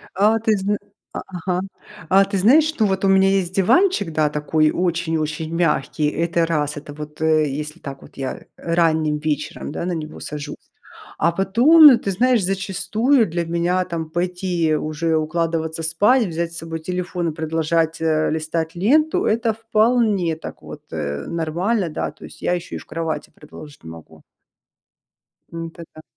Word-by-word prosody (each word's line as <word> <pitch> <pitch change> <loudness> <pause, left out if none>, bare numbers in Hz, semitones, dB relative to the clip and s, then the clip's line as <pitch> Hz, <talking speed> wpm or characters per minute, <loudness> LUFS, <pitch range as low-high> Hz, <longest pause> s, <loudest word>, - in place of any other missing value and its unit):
А 210 +4 +3
ты 220 -1 +1
зна 200 +2 0 0.4
а, - - -4
ага, 180 0 -3 0.5
а 195 +1 +6
ты 200 0 -3
знаешь, 300 +11 +4
ну 215 - +3
вот, 190 0 -1
у 195 - +4
меня 195 0 +5
есть 190 -2 0
диванчик, 220 - +3
да, 155 -1 +2
такой 150 +1 +1
очень-очень 160 -3 -2
мягкий, 150 -3 0
это 170 +1 0
раз, 150 -2 -1
это 145 0 -8
вот, 150 +1 -9
э, 155 -1 +3
если 150 +4 -6
так, 135 -1 -8
вот - - -16
я 135 -1 -5
ранним 160 -3 +1
вечером, 150 -1 -3
да, 170 - -4
на 180 - -1
него 155 -1 -7
сажусь. 150 -1 -8 0.5
А 170 +2 +2
потом, 245 - +7
ты 200 - -3
знаешь, 240 +3 +2
зачастую 210 +7 +1
для 170 0 -2
меня, 175 +2 0
там, 165 -3 -5
пойти 175 -2 0
уже 155 +2 -1
укладываться 160 +1 -1
спать, 205 +10 +3
взять 170 -1 -3
с 170 - -7
собой 165 0 -6
телефон 180 0 -3
и - - -6
продолжать, 160 +1 -1
э, 155 -1 +1
листать 160 +1 -2
ленту- 300 - +2
это 225 0 +1
вполне 215 -6 +1
так, - - -10
вот, - - -10
э, 70 -2 -3
нормально, 175 +5 -1
да, 155 - -3
то 150 - -16
есть - - -15
я - - +1
ещё 175 0 -6
и - - -4
в - - -12
кровати 160 0 -4
продолжить 150 -1 -13
могу. 80 -1 -12 1.3
Это 165 0 -7
да. 155 - -12
170 Hz, 165 wpm, -21 LUFS, 155-195 Hz, 1.3 s, потом